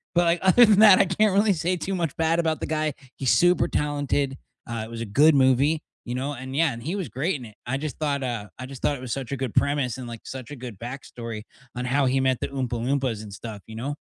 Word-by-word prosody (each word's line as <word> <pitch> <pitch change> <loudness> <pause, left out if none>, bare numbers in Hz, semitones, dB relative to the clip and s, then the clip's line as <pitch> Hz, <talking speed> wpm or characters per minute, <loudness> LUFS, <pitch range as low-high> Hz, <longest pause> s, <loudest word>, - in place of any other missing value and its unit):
but, 175 - +5
like, 170 +1 +2
other 230 +6 +7
than 210 -1 +4
that, 210 -4 +9
I - - +7
can't 195 +2 +2
really 205 +1 +4
say 180 +1 0
too 185 +3 -4
much 170 -5 -2
bad 165 +1 +1
about 160 -2 0
the - - -1
guy. 155 -2 -1 0.2
He's 130 -3 +1
super 175 +1 +4
talented, 145 -2 -1 0.3
uh, 115 -1 -3
it 110 - -11
was 115 0 -6
a - - -2
good 145 +9 +5
movie, 140 +4 +3 0.2
you 120 0 -4
know, 135 +3 -2
and 130 +1 -7
yeah, 160 -2 +3
and 115 - -8
he 170 +7 -2
was 190 -4 -4
great 155 +8 -1
in 130 - -7
it. 110 - -13
I 120 - -2
just 150 0 -5
thought, 140 -3 -1
uh 115 -5 -3
I 130 - -5
just 135 -1 -10
thought 145 - +1
it 130 - -9
was 125 -3 -6
such 135 -1 -5
a - - -2
good 130 -3 -3
premise 140 -4 +1
and, 125 -2 -7
like, 115 -1 -8
such 130 0 -8
a - - -5
good 120 -6 -9
backstory 115 -3 -7 0.3
on 125 - -3
how 135 +2 +2
he 130 +1 +2
met 130 -2 +1
the - - -1
Oompa 130 -3 -3
Loompas 130 -4 -1
and 100 -2 -10
stuff, 105 -2 -8
you 110 - -9
know. 135 +6 -3
135 Hz, 275 wpm, -25 LUFS, 125-160 Hz, 0.3 s, that